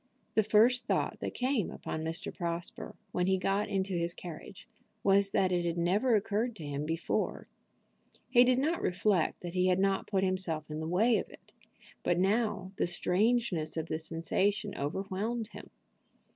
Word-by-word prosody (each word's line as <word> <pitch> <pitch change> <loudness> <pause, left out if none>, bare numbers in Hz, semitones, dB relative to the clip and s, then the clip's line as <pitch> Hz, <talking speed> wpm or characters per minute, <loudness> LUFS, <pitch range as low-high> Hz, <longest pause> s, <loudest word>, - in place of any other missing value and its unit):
The 220 - +4
first 220 +4 +4
thought - - 0
that - - -4
came 255 -5 0
upon 155 - -5
Mr. 160 +1 -2
Prosper, 170 -1 -5 0.2
when 180 0 0
he 190 0 +3
got 195 +2 0
into 195 0 -1
his 170 0 -1
carriage, 170 -3 -9 0.4
was 195 0 +4
that 190 -1 +2
it 175 -1 +1
had 170 0 -1
never 200 +8 +2
occurred 215 +3 0
to 160 - -8
him 145 +1 -3
before. 165 +1 -2 0.8
He 245 -1 +6
did 250 0 +3
not 310 +6 0
reflect 185 -1 +1
that 175 -1 -6
he 185 0 +2
had 180 -1 +3
not 195 0 +1
put 195 -2 +1
himself 175 -5 -1
in 155 - -4
the 160 - -3
way 215 +8 +3
of - - -6
it: - - -17 0.5
but 175 - +1
now 200 0 +1
the - - +1
strangeness 180 -2 +1
of 160 0 -3
the 155 - -1
sensation 195 +6 -1
overwhelmed 200 +9 -3
him. - - -11
190 Hz, 170 wpm, -31 LUFS, 170-215 Hz, 0.8 s, He